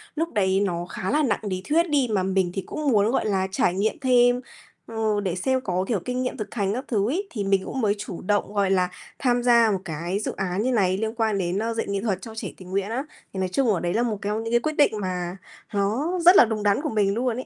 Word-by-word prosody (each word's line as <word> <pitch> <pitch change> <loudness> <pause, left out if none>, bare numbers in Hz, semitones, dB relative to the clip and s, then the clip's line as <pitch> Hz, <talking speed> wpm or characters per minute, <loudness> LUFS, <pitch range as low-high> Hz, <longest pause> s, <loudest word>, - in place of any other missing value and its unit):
lúc 330 +2 -2
đấy 190 -3 +2
nó 175 -4 -1
khá 185 +1 -4
là 300 +1 +2
nặng 230 -7 +1
lý 185 -3 -3
thuyết 335 +3 +3
đi 280 -4 +2
mà 195 -3 +1
mình 190 -1 +1
thì 195 - -2
cũng 300 +8 -3
muốn, 215 -2 +3
gọi 265 - 0
là, 190 -3 +1
trải 180 - +1
nghiệm 210 - -1
thêm, 245 -2 +4 0.5
ừ, 220 -2 0
để 185 -3 -1
xem 260 +7 0
có, 185 -5 -1
kiểu, 220 -5 0
kinh 250 0 -2
nghiệm 250 - -3
thực 215 - -6
hành 200 -3 0
các 255 +5 -4
thứ 210 -2 +1
ấy, 380 +9 -2
thì 210 -5 -4
mình 195 -1 +1
cũng 265 - -3
mới 205 -2 +2
chủ 200 -3 -7
động, 205 +1 0
gọi 200 -2 +1
là, 180 -1 +2 0.3
tham 245 -2 +1
gia 235 -2 +5
một 195 - 0
cái 170 +4 -3
dự 215 - -2
án 190 0 -1
như 255 +4 +1
này 190 -6 +2
liên 220 +2 -2
quan 220 -3 +1
đến, 185 0 -1
a, 230 +1 -1
dạy 225 - -2
nghệ 200 -1 -1
thuật 195 -4 -1
cho 220 +2 -9
trẻ 225 - -4
tình 185 -1 -12
nguyện 195 +1 -1
á. 245 +4 -2 0.3
Thì 190 - -4
nói 185 -1 0
chung 260 +8 +1
ở 180 - 0
đấy 175 0 -1
là 235 - +2
một 225 -3 -1
cong 210 +2 -2
những 225 +1 -4
cái 240 - +5
quyết 310 +5 -2
định 290 - +4
mà 180 -1 -3 0.4
nó 235 - 0
rất 355 +2 +9
là - - +8
đúng 220 -2 -3
đắn 205 +5 +2
của 310 - -2
mình 205 -5 +1
luôn 240 +1 0
ấy. 255 - -5
210 Hz, 280 wpm, -24 LUFS, 190-245 Hz, 0.5 s, rất